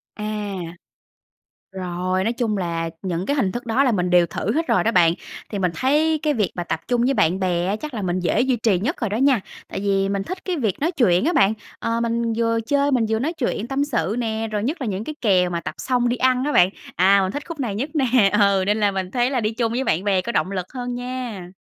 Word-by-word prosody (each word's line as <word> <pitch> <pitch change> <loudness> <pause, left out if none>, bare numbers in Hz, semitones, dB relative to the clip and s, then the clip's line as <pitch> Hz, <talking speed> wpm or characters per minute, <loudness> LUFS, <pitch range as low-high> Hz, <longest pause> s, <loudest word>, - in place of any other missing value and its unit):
À. 210 -1 -4 1.2
Rồi, 185 0 -2
nói 230 - +1
chung 230 -3 -1
là 170 -3 -2
những 180 -1 -2
cái 285 - 0
hình 200 -9 +1
thức 240 - -5
đó 240 +5 +2
là 255 - +3
mình 180 -3 0
đều 175 -1 +5
thử - - -2
hết 325 +2 0
rồi - - +3
đó 225 - +2
bạn, 170 -4 +5 0.4
thì 205 - -3
mình 180 -2 +1
thấy 305 - +2
cái 300 -2 +1
việc 210 -6 0
mà 175 - -3
tập 165 - -2
chung 245 -1 +2
với 265 +3 +2
bạn 175 -4 +2
bè 175 -2 0
á 200 +3 0
chắc 300 +4 -7
là 215 - -3
mình 185 0 -1
dễ 180 +5 +1
duy 255 0 +2
trì 220 -5 +2
nhất 275 - -2
rồi 225 - 0
đó 210 - -1
nha. 265 -1 +3 0.3
Tại - - -5
vì 195 -1 +1
mình 200 0 -1
thích 370 - -7
cái 365 -2 -1
việc 220 - -1
nói 315 +4 +1
chuyện 220 - +3
á 335 - +2
bạn, 195 - +4 0.3
ờ, 230 0 -1
mình 235 0 0
vừa 230 0 +1
chơi 285 0 +2
mình 240 -4 +2
vừa 220 0 +1
nói 290 +8 -1
chuyện 245 -8 -2
tâm 275 +2 0
sự 210 - -1
nè, 225 -1 -2
rồi 210 -1 -2
nhất 300 +7 -2
là 260 - -2
những 200 0 -3
cái 305 - -5
kèo 185 -5 +3
mà 170 -1 -2
tập - - -6
xong 245 -2 +1
đi 240 - 0
ăn 255 0 +2
á 295 - 0
bạn, 180 - +6 0.3
à, 195 +2 +5
mình 190 0 -1
thích 290 +4 -5
khúc 330 -4 -6
này 230 -7 -2
nhất 260 +9 -3
nè 250 -8 +3
ừ, 200 -2 +4
nên 210 +2 +1
là 205 -1 +3
mình 190 -2 -3
thấy 245 +2 +1
là 260 -3 0
đi 215 -1 0
chung 230 0 -1
với 255 +3 -1
bạn 180 -4 0
bè 195 -2 +2
có 235 - -4
động 190 - 0
lực 185 -2 -3
hơn 245 -1 -4
nha. 245 -7 -5
225 Hz, 270 wpm, -22 LUFS, 190-255 Hz, 1.2 s, bạn